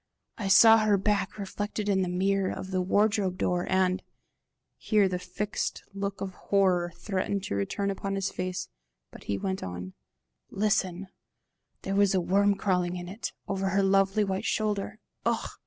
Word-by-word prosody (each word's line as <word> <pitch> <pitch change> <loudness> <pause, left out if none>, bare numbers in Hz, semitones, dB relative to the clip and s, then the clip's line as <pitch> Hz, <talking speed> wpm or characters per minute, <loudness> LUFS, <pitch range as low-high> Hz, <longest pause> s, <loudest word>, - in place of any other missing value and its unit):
"I 205 - -2
saw 225 +3 +8
her 215 -2 +3
back 200 0 0
reflected 205 +1 -4
in 195 -2 +2
the 185 - -1
mirror 195 +1 +1
of 190 - -6
the 185 -1 +1
wardrobe 200 0 +1
door, 175 -1 0
and" 185 0 +2 0.7
here 210 -3 +2
the 180 -1 -2
fixed 200 +4 -3
look 200 0 -4
of 195 -1 -4
horror 180 -3 +1
threatened 195 -1 -2
to 100 - -3
return 200 - -1
upon 195 0 -3
his 195 -1 -1
face, 185 0 -3 0.4
but - - -13
he 100 - -1
went 190 - -3
on 90 +1 -6 0.6
"listen, 195 -2 0 0.8
there 195 - -2
was 200 -1 +3
a - - +4
worm 200 +3 +3
crawling 180 -3 0
on 175 0 -7
it, 200 +6 -5 0.2
over 195 0 -1
her 195 +1 +2
lovely 195 +2 +3
white 195 +1 -2
shoulder! 210 -1 -1 0.3
Ugh! - - -1
195 Hz, 165 wpm, -28 LUFS, 185-200 Hz, 0.8 s, saw